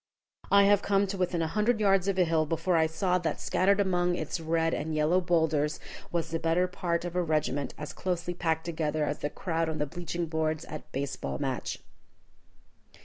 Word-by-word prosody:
I 200 0 +6
have 200 0 +5
come 200 0 +2
to 195 0 -4
within 175 -2 0
a - - 0
hundred 215 +6 +1
yards 195 -2 +3
of 195 -1 0
a 185 - +5
hill 160 -2 +1
before 165 +3 0
I 160 -1 +4
saw 180 +3 0
that 165 -2 -2
scattered 195 +2 +2
among 180 -2 +2
its 175 - -3
red 165 0 +1
and 155 +1 -2
yellow 155 +4 +3
bowlders 160 -4 +1 0.3
was 165 -2 -2
the 165 - -1
better 165 +3 +2
part 175 -1 -2
of 175 0 -5
a 180 - +2
regiment 155 -4 -1
as 150 - -6
closely 175 -1 -2
packed 160 -2 -1
together 155 -2 -1
as 145 - -3
the 145 - -2
crowd 165 0 -2
on 160 - -3
the 150 - 0
bleaching 175 +2 -4
boards 160 0 -1
at 155 - -6
a - - -33
base 140 +1 -3
ball 70 0 -4
match. - - -3
165 Hz, 205 wpm, -29 LUFS, 155-180 Hz, 0.3 s, I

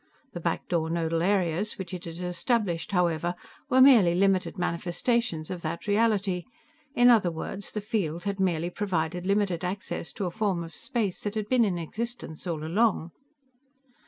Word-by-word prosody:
The 175 - -6
back 170 0 -2
door 165 -2 0
nodal 165 0 0
areas 190 +1 +1
which 190 -2 -6
it 180 0 -5
had 165 -1 -7
established, 180 0 -1
however, 175 -2 +1 0.3
were 260 - +5
merely 225 -11 +7
limited 195 +1 +2
manifestations 175 +1 -1
of 180 -2 -5
that 165 +1 -4
reality 205 -4 +1 0.5
in 245 -1 +7
other 215 -7 +4
words, 170 +4 -5
the 210 - -4
field 195 -7 -2
had 200 -1 -3
merely 175 -2 0
provided 180 -2 -2
limited 195 -4 +1
access 180 -2 -4
to 200 - -3
a 175 - -2
form 195 -3 -1
of 165 - -10
space 225 -8 -2
that 205 0 -3
had 215 -1 -2
been 250 +1 +4
in 190 -5 0
existence 205 -1 -5
all 160 -3 -3
along. 175 0 +1
185 Hz, 165 wpm, -27 LUFS, 170-210 Hz, 0.5 s, merely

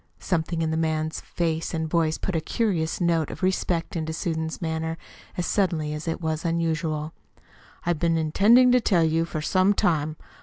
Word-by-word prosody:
Something 165 -2 -1
in 160 - 0
the 160 - 0
man's 160 -1 -1
face 165 -1 -2
and 160 0 -1
voice 160 -1 +1
put 190 - -3
a 160 - +1
curious 175 -6 -1
note 170 -3 +1
of - - -8
respect 180 -2 0
into 160 -1 -2
Susan's 160 -1 -3
manner 160 -1 -2 0.4
as 175 - -1
sudden 190 -5 +1
as 150 +1 -4
it 165 - -1
was 160 -2 -2
unusual. 160 -2 -1 0.7
"I've 170 -2 0
been 165 0 +2
intending 215 +11 +5
to 250 0 +4
tell 180 -7 +3
you 160 +1 +2
for 155 -2 -4
some 190 +4 +3
time. 155 -4 +1
165 Hz, 180 wpm, -25 LUFS, 160-175 Hz, 0.7 s, intending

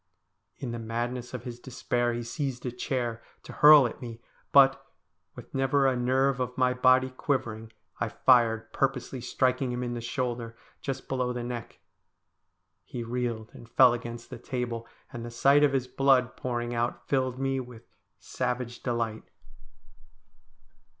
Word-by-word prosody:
In 130 -4 -5
the 120 - -4
madness 120 +2 -3
of 125 - -6
his 120 -1 -7
despair 120 -1 -1
he 120 0 -3
seized 130 +1 -4
a 125 - -2
chair, 120 -2 -3 0.2
to - - -10
hurl 150 -2 +8
at 120 - -5
me, 115 -2 -7 0.3
but, 135 -1 +6 0.5
with - - -12
never 135 +1 +2
a 130 -1 +3
nerve 130 +2 +1
of 125 -1 -3
my 130 -1 +3
body 130 +1 +4
quivering, 120 -5 -2 0.3
I 105 - -1
fired, 115 -1 +3
purposely 135 -1 -1
striking 130 +1 0
him 125 0 -3
in 120 -1 -3
the 120 - -4
shoulder, 120 -1 -3 0.2
just 135 -1 -4
below 125 -2 -1
the 120 -1 -4
neck. 120 -1 -6 1.0
He 120 - -6
reeled 115 -2 -3
and 115 - -13
fell 125 0 +6
against 120 -1 -7
the - - -7
table; 120 -2 -4 0.3
and 120 - -6
the 120 - -6
sight 140 +5 +4
of 145 -2 +4
his 130 -2 +1
blood 130 -2 +3
pouring 120 -1 -3
out 120 +1 -2
filled 130 -2 0
me 135 0 0
with 125 -3 -9 0.3
savage 125 -1 -3
delight. 115 -3 -3
125 Hz, 155 wpm, -28 LUFS, 120-130 Hz, 1.0 s, hurl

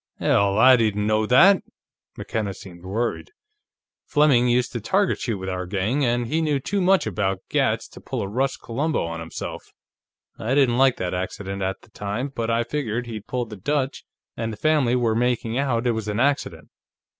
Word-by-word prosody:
"Hell, 100 0 +2
I 130 +3 +7
didn't 105 -3 +1
know 110 0 +1
that!" 185 - +6 0.6
McKenna 100 -3 -3
seemed 85 -2 -12
worried. 110 - -2 0.8
"Fleming 145 -5 +4
used 125 0 +2
to 120 - -4
target 190 - +1
shoot 115 -5 -2
with 95 0 -6
our 90 -1 -3
gang, 105 +9 0
and 120 -1 +1
he 155 +7 0
knew 150 -3 +1
too 200 +9 -2
much 190 +1 +3
about 95 -2 -1
gats - - +1
to - - -13
pull - - -4
a - - -3
Russ 130 +6 -1
Columbo 140 - -2
on 85 0 -5
himself. 80 -1 -7 0.7
I 120 +5 -1
didn't 130 -4 +3
like 135 -2 +4
that 90 -1 -3
accident, 95 +2 -4
at 95 0 -2
the - - -20
time, 105 +7 -3
but 115 -1 -2
I 115 +1 +2
figured 125 -2 -3
he'd 110 -3 -7
pulled 120 -3 -3
the 105 - -7
Dutch, 140 +6 -2 0.3
and 115 0 -3
the 110 - -7
family 145 -2 +2
were 120 -3 +1
making 120 0 0
out 125 -4 0
it 120 - +3
was 110 -2 -3
an 105 +1 -2
accident. 120 - 0
115 Hz, 190 wpm, -23 LUFS, 100-130 Hz, 0.8 s, I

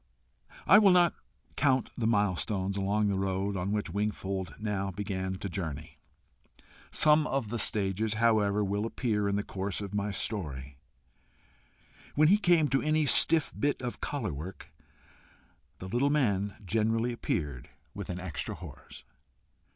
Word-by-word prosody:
I 195 +5 +8
will 205 -2 +6
not 175 -2 +5 0.4
count 130 -3 +2
the 115 - -1
milestones 100 -2 0
along 100 +2 +1
the 100 -1 0
road 95 +1 -1
on 95 +1 -2
which 105 0 -2
Wingfold 100 -5 -3
now 105 -2 -2
began 95 -1 -3
to 95 - -5
journey. 80 -6 -6 0.9
Some 150 0 +4
of 135 -6 -2
the 120 +1 -2
stages, 105 +1 0
however, 105 -2 +2
will 100 +2 -1
appear 105 -4 -1
in 100 - 0
the 105 - -1
course 95 0 -4
of 100 -1 -6
my 105 0 -1
story. 70 - -5 1.4
When 155 +2 +5
he 205 +3 +5
came 175 -6 +4
to 135 - +2
any 155 0 +2
stiff 160 +2 +4
bit 145 0 0
of 125 - -5
collar 145 - -3
work, 80 +7 -9 1.0
the 95 - -8
little 120 +8 +1
man 105 -9 +1
generally 115 +4 +1
appeared 75 - -3 0.2
with - - -7
an 90 0 -4
extra 90 -5 -4
horse. - - -12
105 Hz, 145 wpm, -29 LUFS, 95-120 Hz, 1.4 s, I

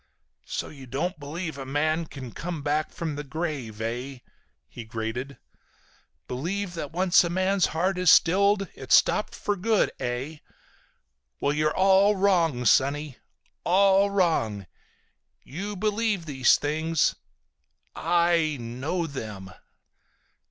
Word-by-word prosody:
"So - - -4
you 135 -3 -12
don't 150 +7 -3
believe 155 +1 -5
a - - -4
man 155 +4 -1
can 130 -5 -9
come 170 +1 -5
back 150 +2 0
from 160 -3 -4
the 145 - -4
grave, 145 -7 -5
eh?" 120 +3 -4 0.5
he 120 - -9
grated. 115 +4 -5 0.9
"Believe 175 +9 -3
that 155 -4 -5
once 180 +2 +4
a 175 - -2
man's 185 +1 +1
heart 180 +4 -1
is 180 -2 +4
stilled 200 +4 +4
it's - - +2
stopped - - +2
for 205 - -2
good, 215 +2 +1
eh? 130 +6 -4 1.0
Well, 140 - +1
you're 155 +1 0
all 195 +2 +5
wrong, 170 -10 +2
sonny. 140 +3 +2 0.5
All 195 +2 +4
wrong! 160 - 0 0.8
You 200 +8 -6
believe 210 -2 -1
these 135 -5 +3
things. 155 +2 0 0.8
I 170 -2 +2
know 130 +9 -3
them!" 105 -10 -7
160 Hz, 125 wpm, -26 LUFS, 135-185 Hz, 1.0 s, all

